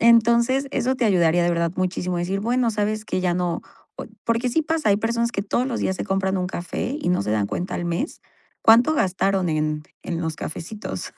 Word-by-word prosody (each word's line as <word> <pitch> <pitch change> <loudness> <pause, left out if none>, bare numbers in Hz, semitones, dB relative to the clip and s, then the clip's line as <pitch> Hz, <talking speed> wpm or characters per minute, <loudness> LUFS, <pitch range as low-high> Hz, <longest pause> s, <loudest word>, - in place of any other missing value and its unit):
Entonces, 235 +4 +4
eso 260 -1 +1
te 250 - 0
ayudaría 175 -3 +3
de 175 - +2
verdad 170 -1 0
muchísimo 180 -1 -1
a - - -1
decir: 190 +3 -1
"Bueno, 240 +2 +1
¿sabes 215 0 -1
que?, - - -1
ya 180 -1 +1
no", 175 -1 -1 0.3
oy - - -7 0.2
porque 230 +2 +1
sí 320 +6 +2
pasa, 320 -4 0
hay 200 - +4
personas 235 +2 0
que 195 - -1
todos 235 +5 0
los 250 -3 -2
días 190 - 0
se - - -3
compran 195 0 0
un 180 - -1
café 185 - -3
y - - -1
no 180 - +2
se 105 - -3
dan 105 -2 +1
cuenta 180 - -3
al 175 - -3
mes, 170 - -3 0.4
cuánto 240 +7 +6
gastaron 195 - +1
en 155 -1 -1 0.2
en 170 -1 -3
los 160 -2 -3
cafecitos. 160 - -6
195 Hz, 220 wpm, -23 LUFS, 175-235 Hz, 0.4 s, cuánto